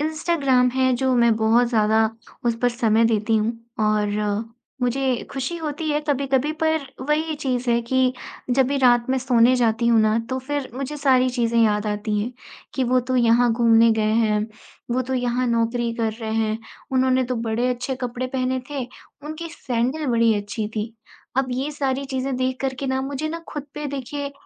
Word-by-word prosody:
Instagram 300 -5 +2
है 260 0 +2
जो 260 0 +1
मैं 235 -2 +4
बहुत 225 +2 +3
ज़्यादा 220 -1 +3 0.4
उस 235 - +2
पर 245 - +5
समय 230 -2 +2
देती 220 0 +2
हूँ, 220 +2 +1 0.3
और 210 0 0 0.4
मुझे 255 0 0
खुशी 275 +5 -3
होती 310 -1 -4
है 295 - +1
कभी-कभी 275 +1 +1
पर 315 -3 +1 0.2
वही 310 +1 +1
चीज़ 255 -4 -2
है 235 - +3
कि 255 +1 +2 0.4
जब 260 +1 +3
भी 280 +2 -1
रात 240 -2 +4
में 265 - +2
सोने 250 -1 +4
जाती 235 -1 +1
हूँ 230 -1 +5
ना 215 +1 +3
तो 260 - -1
फिर 280 +1 -4
मुझे 275 +3 -4
सारी 260 -3 +3
चीज़ें 235 -2 0
याद 210 -1 +2
आती 210 0 -1
हैं, 240 +4 -3 0.4
कि 260 - 0
वो 255 +1 +3
तो 255 +1 -2
यहाँ 240 0 +4
घूमने 230 0 +5
गए 220 - 0
हैं, 215 -2 +2 0.4
वो 255 +2 +1
तो 260 +1 -3
यहाँ 245 0 0
नौकरी 235 0 0
कर 225 -2 -1
रहे 220 0 -3
हैं, 220 0 0 0.3
उन्होंने 260 0 +3
तो 250 0 -2
बड़े 240 +3 0
अच्छे 250 +2 -2
कपड़े 250 0 -3
पहने 255 0 -1
थे, 275 -4 -3 0.4
उनकी 315 +2 -6
सैंडल 260 +3 -2
बड़ी 230 -2 +3
अच्छी 210 +1 -4
थी, 215 +2 -3 0.4
अब 265 0 +2
ये 265 +4 -2
सारी 275 -2 -2
चीज़ें 265 0 -2
देख 255 0 -1
कर 265 -1 -1
के 275 - -2
ना 265 0 0
मुझे 280 +3 -3
ना 330 +2 -4
ख़ुद 295 - -4
पे 295 0 -4
देखिए 280 +1 -5
250 Hz, 190 wpm, -22 LUFS, 230-270 Hz, 0.4 s, पर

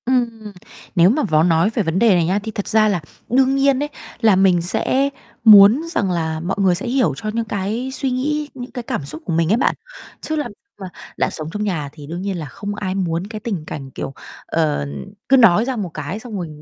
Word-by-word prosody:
Ừm. 230 -4 -1 0.4
Nếu 175 +1 +6
mà 285 +7 +1
vói 155 -7 +3
nói 165 +3 +3
về 220 - 0
vấn 165 +1 -1
đề 235 - +4
này 170 -2 +2
nhá, 190 +4 +1
thì 220 - -5
thật 205 -1 -5
ra 220 -1 +4
là 195 -5 0 0.3
đương 265 +2 +3
nhiên 275 0 +2
ấy 295 - -4 0.3
là 220 -4 +5
mình 185 -2 +4
sẽ 260 +10 +1 0.3
muốn 215 +4 +8
rằng 195 - 0
là 160 -2 -2
mọi 175 +4 -2
người 190 -3 +3
sẽ 200 - -3
hiểu 245 - +2
cho 215 - -4
những 230 0 -1
cái 215 +5 -3
suy 265 -1 -1
nghĩ, 295 +4 -1
những 250 -1 -8
cái 245 -3 -6
cảm 150 - -4
xúc 150 +3 -8
của 170 - -2
mình 165 0 +1
ấy - - +3
bạn. - - +1 0.5
Chứ 315 - -3
làm 300 - -2
gì - - -15 0.3
mà 190 - -5 0.3
đã - - +1
sống 155 0 -5
trong 210 - -2
nhà 165 -9 -2
thì 145 -2 -11
đương 170 +3 -5
nhiên 195 -1 -3
là 160 - -5
không 205 +9 -6
ai 190 -2 -3
muốn 175 -1 -2
cái 215 0 -7
tình 200 -7 -4
cảnh 135 -4 -7
kiểu, 135 - -6 0.3
ờ, 150 - 0 0.4
cứ 270 - +6
nói 225 -3 +5
ra 260 0 -2
một 205 -6 -3
cái 155 +7 -5
xong 220 -3 -7
rồi 175 -3 -4
205 Hz, 240 wpm, -20 LUFS, 170-240 Hz, 0.5 s, muốn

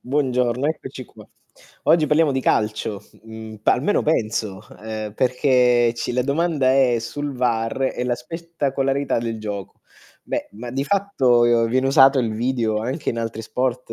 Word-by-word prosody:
Buongiorno, 125 -1 0
eccoci 140 -4 -5
qua. - - -16 0.6
Oggi 160 -2 +4
parliamo 150 -1 +3
di 130 - 0
calcio, 105 -3 -1 0.2
mhmm, 110 -1 -9
pa - - +4
almeno 150 +12 +1
penso, 110 -8 -1 0.2
ehm, 110 -1 -5
perché 125 -1 +3
ci 120 - -3
la 125 +1 +1
domanda 140 -2 +1
è 130 -3 +3
sul 145 +5 -5
VAR 120 0 -1
e - - -3
la 125 -1 0
spettacolarità 140 -1 -2
del 115 -1 -3
gioco. 100 -3 -7 0.4
Beh, - - -4
ma 120 +4 -8
di 135 +2 -2
fatto 140 -10 +2 0.2
viene 130 +3 +1
usato 135 0 +6
il 115 -4 0
video 115 -1 -1
anche 130 +8 -3
in 115 - -4
altri 115 -1 -4
sport 125 +1 -2
125 Hz, 155 wpm, -21 LUFS, 115-135 Hz, 0.6 s, usato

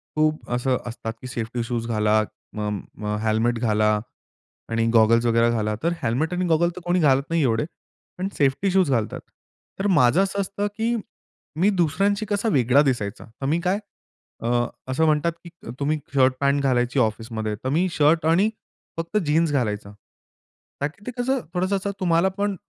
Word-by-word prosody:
खूप 155 0 0
असं 125 +1 +1
असतात, 115 -1 -5
की 130 - -7
सेफ्टी 120 0 -3
शूज 115 -1 -3
घाला, 110 -1 +2 0.3
म 105 0 -2 0.4
अ, 105 - 0
हेल्मेट 115 +2 +1
घाला 105 -2 +2 0.7
आणि 115 0 +1
गॉगल्स 115 +1 +5
वगैरे 115 0 +3
घाला. 110 -2 -1
तर 170 - +2
हेल्मेट 140 +10 0
आणि 180 0 0
गॉगल 170 +1 +3
तर 180 - -8
कोणी 180 +1 +2
घालत 140 -3 +4
नाही 165 -1 +1
एवढे, 115 +1 +1 0.5
पण 185 +1 -2
सेफ्टी 145 +8 +2
शूज 185 -6 +3
घालतात. 115 -4 0 0.6
तर 195 - +1
माझं 170 -3 +4
असं 195 +1 -2
असतं 200 +2 -2
की 230 +2 +1 0.6
मी 195 - +4
दुसऱ्यांशी 195 +3 +1
कसा 210 +2 0
वेगळा 130 - +4
दिसायचा, 120 -8 -1 0.2
तर - - -2
मी 160 +5 +1
काय 185 +3 +1 0.6
अ, - - -1 0.4
असं 135 +5 +1
म्हणतात 155 +2 +2
की 170 - -10 0.3
तुम्ही 150 +2 +1 0.2
शर्ट 130 -1 +4
पॅन्ट 140 0 +2
घालायची 125 0 +1
ऑफिसमध्ये, 110 -1 -1
तर 130 +5 -5
मी 165 +7 +2
शर्ट 155 +2 +3
आणि 185 +6 +4 0.5
फक्त 165 +5 -2
जीन्स 155 +2 +2
घालायचा. 105 -6 -1 0.9
का 140 - +2
की 200 +7 -17
ते 250 - -2
कसं 260 +2 +1
थोडसं 185 +3 0
असं 200 +1 -2
तुम्हालापण, 190 +3 +1
140 Hz, 170 wpm, -23 LUFS, 115-180 Hz, 0.9 s, गॉगल्स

